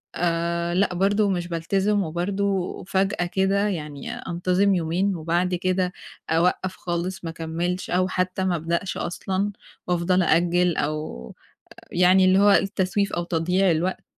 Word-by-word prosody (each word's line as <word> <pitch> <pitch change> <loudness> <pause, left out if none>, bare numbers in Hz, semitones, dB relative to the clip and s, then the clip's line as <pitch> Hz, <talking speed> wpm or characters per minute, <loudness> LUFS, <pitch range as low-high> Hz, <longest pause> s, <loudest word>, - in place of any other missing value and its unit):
آآ 170 0 0
لأ، 185 0 +2
برضه 200 +3 +2
مش 175 -2 -1
بالتزم، 195 +4 0
وبرضه 190 +3 -2
فجأة 195 -1 0
كده 195 +3 +1
يعني 150 -7 -5
أنتظم 180 +3 +1
يومين، 180 +3 0
وبَعد 175 +3 0
كده 185 0 0 0.4
أوقّف 180 +3 +1
خالص 175 +2 -4
ما 165 - -4
أكمّلش 170 +3 -3
أو 185 +1 +2
حتّى 185 0 -1
ما 180 -2 +1
أبدأش 170 +4 -2
أصلًا، 190 +3 -2 0.4
وأفضل 180 +1 +2
أأجل 175 +1 +2
أو 150 - -4 0.6
يعني 180 +2 +5
اللي 185 +1 +5
هو 205 0 +6
التسويف 195 0 +1
أو 175 - -1
تضييع 180 +2 +1
الوقت، 175 +4 -1
180 Hz, 135 wpm, -24 LUFS, 170-190 Hz, 0.6 s, هو